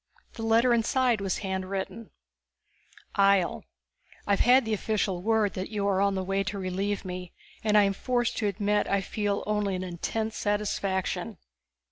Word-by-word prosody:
The - - -8
letter 230 +2 +4
inside 235 -1 +2
was 195 -2 -1
handwritten. 190 +3 -4 1.1
Ihjel: 195 -3 +3 0.7
_I've 200 -1 +2
had 255 +1 +5
the 220 - -1
official 200 -3 -1
word 220 -1 +2
that 185 +1 -4
you 205 -2 -1
are 195 -1 +2
on 200 0 +2
the 190 - -1
way 195 +1 0
to 200 +1 -3
relieve 195 +2 -2
me 180 -1 -6 0.3
and 215 -1 +3
I 210 - +7
am 195 0 +2
forced 240 +3 -1
to 210 - 0
admit 205 +1 0
I 200 0 +1
feel 205 +1 -2
only 210 -2 0
an 185 - -3
intense 210 +5 -3
satisfaction. 200 -1 -1
200 Hz, 160 wpm, -28 LUFS, 190-220 Hz, 1.1 s, I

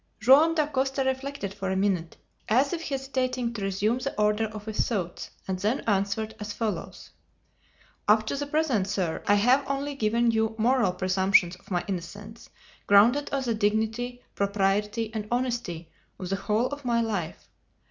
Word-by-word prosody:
Joam 285 +8 +6
Dacosta 275 -3 0
reflected 265 -5 -3
for 195 -1 -4
a 190 - 0
minute 190 -4 0 0.3
as 260 +7 +3
if 335 - -3
hesitating 260 -4 -2
to 220 - -6
resume 200 +5 0
the 275 -3 -4
order 210 +1 +2
of 215 -1 -8
his 220 -1 -1
thoughts, 185 -7 -3 0.2
and 190 -1 -2
then 220 +8 0
answered 205 +1 -1
as 210 0 -5
follows: 220 -3 -4 1.0
"Up 215 +1 +4
to - - -2
the 290 +1 -3
present, 285 -10 +1
sir, 190 -5 -2
I 205 - +5
have 250 +7 +4
only 280 +1 -2
given 235 -1 +2
you 220 0 0
moral 235 -4 +2
presumptions 185 -1 +2
of 180 - -22
my 180 -3 -1
innocence 205 +4 -7 0.4
grounded 235 +8 +5
on 275 -1 -1
the 235 -2 0
dignity, 220 +4 -1
propriety, 205 +2 0
and 215 -2 -4
honesty 235 -10 -2 0.3
of 185 - -6
the 195 - 0
whole 215 +4 0
of 285 0 -7
my 235 -2 +1
life. 200 -8 -3
220 Hz, 165 wpm, -27 LUFS, 200-255 Hz, 1.0 s, Joam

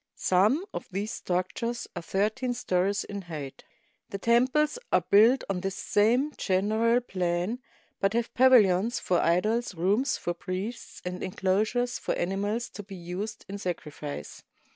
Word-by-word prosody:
Some 210 - +2
of - - -5
these 200 +3 -3
structures 210 +7 -2
are 175 - -4
thirteen 215 +8 -1
stories 190 -1 0
in 200 -1 -6
height. 155 -6 -7 0.5
The 195 - -4
temples 255 - +2
are - - +3
built 225 +6 +6
on 195 -2 -1
this 195 +1 -3
same 240 +11 +2
general 220 +5 +2
plan, 185 +1 -1 0.4
but 195 +1 +1
have 235 0 -1
pavilions 235 -3 +5
for 180 -6 +1
idols, 210 +6 +1
rooms 200 - +1
for 175 - -2
priests, 185 +6 -6
and 180 0 -4
inclosures 215 +7 0
for - - -2
ani 180 +3 -1
mals 210 +4 -2
to - - -7
be 200 -1 -10
used 185 +5 -6
in 200 +1 -6
sacrifice. 150 -6 -6
200 Hz, 145 wpm, -28 LUFS, 180-235 Hz, 0.5 s, built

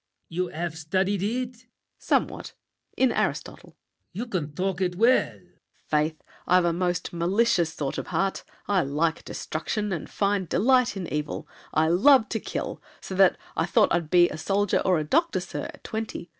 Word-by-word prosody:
LAFFEMAS. 165 - -18
You 180 +1 0
have 170 -1 -4
studied 185 +5 0
it? 245 +5 -1
SAVERNY. 240 0 -23 0.3
Somewhat. - - -1 0.4
In 260 -2 +4
Aristotle. - - -2
LAFFEMAS. - - -32
You 215 +7 -4
can 180 -11 -3
talk 190 +1 -1
it 180 -1 0
well! 235 +7 +4
SAVERNY. - - -26 0.4
Faith! 155 +1 0 0.2
I've 180 0 +4
a 170 - +2
most 180 +1 -1
malicious 175 0 +2
sort 140 -2 -3
of - - -6
heart. 195 0 -1 0.2
I 200 -3 +3
like 160 +3 0
destruction; 185 +2 -3
find 200 -3 0
delight 250 +4 +3
in 185 - -4
evil; 150 0 -3 0.2
I 155 +1 +2
love 225 - +5
to 225 - -1
kill! - - -5 0.2
So - - -8
that 190 0 +5 0.2
I 165 - 0
thought - - +3
I'd 170 -3 0
be 175 0 +6
A 155 - -6
soldier 200 +3 +1
or 185 -2 +3
a 155 - 0
doctor, 330 - +1
sir, - - -5
at - - -18
twenty. 220 -5 -5
185 Hz, 180 wpm, -26 LUFS, 165-210 Hz, 0.4 s, be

